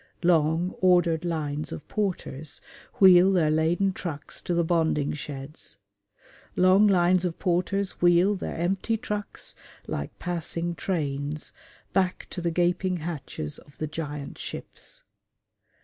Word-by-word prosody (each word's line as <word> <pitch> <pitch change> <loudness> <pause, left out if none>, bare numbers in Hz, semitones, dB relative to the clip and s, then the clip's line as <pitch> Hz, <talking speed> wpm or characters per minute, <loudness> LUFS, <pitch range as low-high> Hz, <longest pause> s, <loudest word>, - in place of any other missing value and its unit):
Long, 165 +1 +3
ordered 175 -3 +3
lines 155 -3 -2
of - - -7
porters 165 -8 -3 0.4
wheel 185 -1 +8
their 165 -5 +3
laden 170 +5 +2
trucks 160 -6 -5
to 175 - -2
the 170 - +3
bonding 160 -3 +1
sheds; 140 -7 -7 0.8
long 185 +3 +6
lines 180 -1 +4
of 175 -2 -2
porters 185 +2 0
wheel 175 +3 +5
their 195 - -4
empty 195 +6 0
trucks, 210 -2 -3 0.3
like 70 - -5
passing 170 0 -3
trains, 150 -4 -3 0.4
back 185 -1 +1
to 180 - -4
the 170 - 0
gaping 180 +2 +1
hatches 155 - -5
of 145 - -20
the 155 - -2
giant 150 -2 -6
ships. - - -8
170 Hz, 125 wpm, -26 LUFS, 155-185 Hz, 0.8 s, wheel